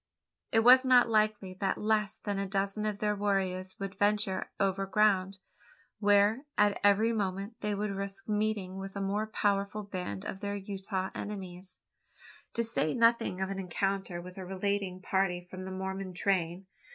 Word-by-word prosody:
It 225 - +4
was 255 +3 +8
not 250 -2 +5
likely 215 -3 +1
that 195 -2 0
less 215 -1 +1
than 200 -2 -3
a 195 - -1
dozen 195 +2 -1
of 210 -1 -2
their 210 0 0
warriors 190 -2 -1
would 195 -1 -4
venture 205 -2 +1
over 195 0 +1
ground, 195 -2 +2 0.6
where, 205 +5 +4
at 205 -1 +3
every 205 +3 +4
moment, 200 +1 -2
they 210 -1 -1
would 205 0 -2
risk 195 0 -4
meeting 210 -3 -1
with 195 0 -7
a - - -3
more 200 +2 -1
powerful 205 -1 0
band 180 - -5
of 190 - -5
their 205 0 -3
Utah 195 -1 -4
enemies 185 -2 -6 0.7
to 235 - +1
say 220 -9 0
nothing 230 -5 +3
of 190 +1 -1
an 195 - -3
encounter 195 0 -2
with 180 +2 -9
a - - -5
retaliating 190 0 -2
party 190 -2 +1
from 185 +1 -8
the 190 - -6
Mormon 190 0 -4
train? 185 -1 0
195 Hz, 165 wpm, -31 LUFS, 190-210 Hz, 0.7 s, was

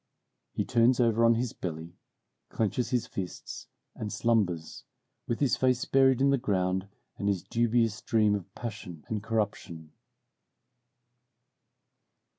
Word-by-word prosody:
He - - -2
turns 120 +2 +3
over 115 -1 +3
on 115 0 +5
his 120 0 -2
belly, 85 -1 -6 0.6
clenches 115 +3 -1
his 125 -2 0
fists, 95 -7 -7 0.3
and 105 -1 -5
slumbers, 95 -9 0 0.4
with 115 - -1
his 140 -4 +2
face 130 -1 +1
buried 130 -1 +4
in 140 0 +4
the 140 - +2
ground 95 -4 0 0.3
and 100 - -1
his 100 -4 0
dubious 115 -2 +1
dream 110 -3 +2
of 100 -2 -4
passion 100 -9 -7
and 110 -2 -2
corruption. 100 -7 -3
110 Hz, 125 wpm, -29 LUFS, 95-120 Hz, 0.6 s, on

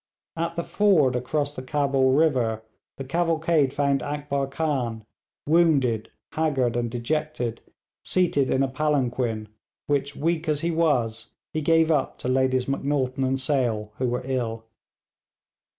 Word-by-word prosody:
At 170 0 -2
the 170 - -2
ford 165 -13 +3
across 145 +3 -1
the 130 - -5
Cabul 135 -1 +1
river 125 -8 +2 0.3
the 135 - -5
cavalcade 160 -1 +1
found 140 -1 +1
Akbar 145 -1 -2
Khan 130 -7 -2 0.4
wounded, 140 -9 +2 0.2
haggard, 135 -7 0
and 120 -1 -1
dejected, 120 -1 -2 0.4
seated 165 -7 +1
in 130 - +2
a - - +1
palanquin, 130 -6 -1 0.4
which, 140 -1 -1
weak 165 +1 -1
as 150 -1 +1
he 170 - 0
was, 125 -9 0 0.2
he 155 - -1
gave 165 +1 +3
up 150 -4 0
to - - -6
Ladies 130 0 +2
Macnaghten 135 -1 -1
and 130 +1 0
Sale, 120 -6 0
who 130 - +1
were 125 +1 -2
ill. 115 -4 -2
135 Hz, 135 wpm, -25 LUFS, 125-155 Hz, 0.4 s, ford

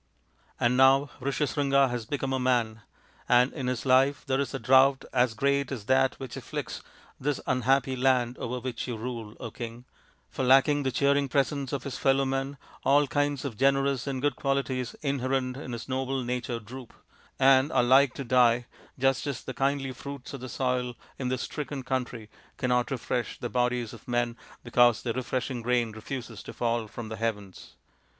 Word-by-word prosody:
" - - -36
And 120 +1 +2
now 135 +2 +5
Rishyasringa 140 0 +1
has 120 -3 -4
become 135 -1 -2
a 130 - 0
man: 120 -4 +1 0.5
and 125 +2 +4
in 135 -4 -4
his 125 0 -2
life 135 +2 +3
there 135 -1 0
is 140 - -1
a - - -3
drought 130 +3 +4
as 125 -2 +2
great 140 +2 +1
as 115 -7 -5
that 130 +1 +3
which 130 -4 -7
afflicts - - -5 0.4
this 145 +1 -1
unhappy 130 +1 +2
land 125 -1 +2
over 125 +1 -3
which 125 -1 -4
you 120 -3 -3
rule, 115 -2 -6 0.2
King; 120 0 -7 0.4
for - - -4
lacking 135 +3 +5
the 135 -1 -1
cheering 140 +1 +2
presence 140 0 0
of 140 -3 -3
his 135 -3 -5
fellow 135 0 +3
men 135 +1 -2 0.3
all 145 +2 +4
kinds 145 0 -1
of 120 -6 -5
generous 135 -1 +2
and 135 -1 -3
good 145 -3 +1
qualities 135 -3 -1
inherent 130 -2 -1
in 130 -2 -7
his 115 -2 -6
noble 130 0 -2
nature 120 -1 -3
droop, 120 +3 -10 0.4
and 135 +2 +5
are - - +3
like 130 +2 +5
to 140 - -4
die, 120 -1 +3 0.3
just 135 -2 +1
as 140 - -4
the 130 - -6
kindly 135 +1 0
fruits 140 +1 -8
of 135 - -7
the 130 - -6
soil 125 0 -1 0.2
in 130 - -2
this 130 0 -1
stricken 145 -3 -5
country 125 -4 -3 0.3
cannot 125 -1 +1
refresh 125 -2 -2
the 120 - -4
bodies 125 -2 0
of 115 - -13
men, 120 -1 0 0.3
because 120 -1 +4
the 115 - -1
refreshing 130 0 -3
rain 120 -1 +1
refuses 115 +4 -7
to - - -9
fall 115 -1 -1
from 110 +1 -8
the 110 - -5
heavens. 105 -4 -4
130 Hz, 180 wpm, -28 LUFS, 120-135 Hz, 0.5 s, now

